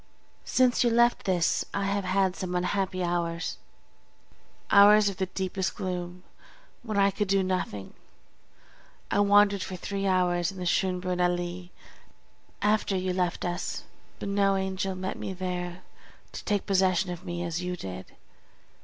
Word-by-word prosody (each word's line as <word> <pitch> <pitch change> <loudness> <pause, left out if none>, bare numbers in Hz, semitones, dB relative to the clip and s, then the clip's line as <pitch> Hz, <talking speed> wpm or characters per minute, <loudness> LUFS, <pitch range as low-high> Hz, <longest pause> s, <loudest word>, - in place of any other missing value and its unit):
Since 255 -1 +3
you 240 - +3
left 235 +1 +3
this 180 -3 +1
I 200 - 0
have 200 0 -1
had 190 0 +1
some 180 -1 -4
unhappy 185 0 -1
hours, 170 -1 -2 1.1
hours 205 +1 +7
of 195 - -7
the 190 - -1
deepest 190 0 -3
gloom, 180 -2 -4 0.6
when 220 -4 -4
I 200 0 +4
could 210 +1 -2
do 195 0 +2
nothing. 180 - -3 1.2
I - - +2
wandered 205 -1 +5
for 185 - -5
three 195 +2 -3
hours 180 -1 +2
in 195 - -12
the 180 - -4
Schönbrunn 180 0 0
Allée 175 0 -1 0.9
after 210 -2 +2
you 185 0 -1
left 180 -1 -1
us, 175 0 -3 0.3
but - - -6
no 200 0 +2
angel 190 0 -2
met 185 0 -4
me 190 - -4
there 180 -1 -4 0.5
to - - -8
take 205 -2 0
possession 190 -1 +2
of 175 - -7
me 175 0 -4
as 170 0 -3
you 180 0 -3
did. 95 - -7
185 Hz, 150 wpm, -27 LUFS, 180-200 Hz, 1.2 s, hours